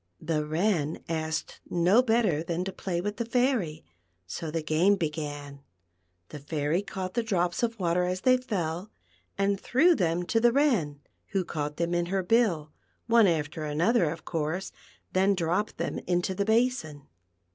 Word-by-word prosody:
The 155 -1 -1
Wren 160 0 0
asked 160 -1 -3
no 180 +7 +4
better 220 -10 +2
than 170 +1 -2
to 195 - -3
play 175 -2 -3
with 205 +2 -3
the 235 - -1
Fairy; 235 - 0 0.4
so 155 - -5
the 160 0 -2
game 165 +6 +3
began. 145 -4 -4 0.7
The 150 - -8
Fairy 150 +4 -1
caught 190 -2 -5
the 235 - +1
drops 180 -6 0
of 230 -2 -1
water 180 0 +1
as 185 +1 -2
they 255 +3 +5
fell, 190 -7 -3 0.5
and 200 0 +1
threw 330 +8 +4
them 175 - 0
to 225 +6 +1
the 240 +1 +5
Wren, 225 - +1 0.3
who 190 -2 +1
caught 150 -2 -4
them 170 0 -1
in 175 0 0
her 190 +1 0
bill 180 -8 +2 0.2
— - - -43
one 225 -3 +7
after 155 -1 -1
another, 165 +5 +2
of 160 +1 -7
course 165 +4 -2 0.2
— - - -33
then 195 +2 +3
dropped 180 +4 -1
them - - -2
into 175 +1 +1
the 200 +2 -1
basin. 220 - 0
175 Hz, 170 wpm, -28 LUFS, 155-210 Hz, 0.7 s, one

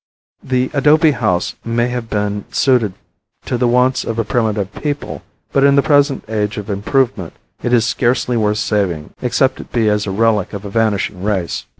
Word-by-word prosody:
The 130 0 -1
adobe 150 +3 +4
house 95 -10 0
may 120 +1 0
have 120 -2 -4
been 105 -1 -2
suited 120 -7 +2 0.5
to - - -2
the 120 0 +1
wants 125 +2 +2
of 115 - -4
a 115 - +1
primitive 105 -2 -1
people, 145 +4 -4 0.3
but 135 - +2
in 140 0 +5
the 140 - +4
present 145 -2 +2
age 105 0 -2
of 105 0 -5
improvement, 105 - -1 0.3
it 120 - -2
is 120 -2 +4
scarcely 125 0 0
worth 105 -2 +1
saving 95 -9 -1
except 130 +1 +1
it - - -10
be 115 -3 +2
as 105 0 0
a - - -2
relic 105 -1 +1
of 100 0 -6
a 100 - -6
vanishing 105 -4 0
race. 95 -4 -2
115 Hz, 185 wpm, -17 LUFS, 105-125 Hz, 0.5 s, in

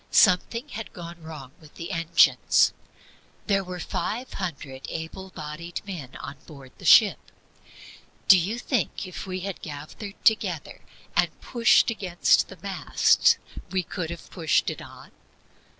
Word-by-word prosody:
Something 230 +9 +3
had 225 -2 -7
gone 170 -1 -9
wrong 155 -5 -9
with 150 -1 -17
the 170 +3 -6
engines. 165 -2 +4 0.7
There 195 -2 +2
were 180 -1 -7
five 235 +8 -3
hundred 140 -8 -6
able 165 +4 -6
bodied 165 +1 -6
men 165 -10 -7
on 145 - -8
board 140 -4 -12
the - - -11
ship. - - +7 1.1
Do - - +10
you 190 +6 0
think 245 -2 -1
that - - -4
if 185 - -7
we 185 0 -4
had 195 0 -5
gathered 155 +7 -8
together 220 -2 +1 0.3
and - - +1
pushed 235 -1 +4
against 185 -6 +2
the - - -12
mast - - +3 0.3
we 190 -1 0
could 165 -1 -5
have 170 -1 -9
pushed 165 -4 +1
it - - -8
on? - - -13
180 Hz, 145 wpm, -26 LUFS, 160-195 Hz, 1.1 s, Do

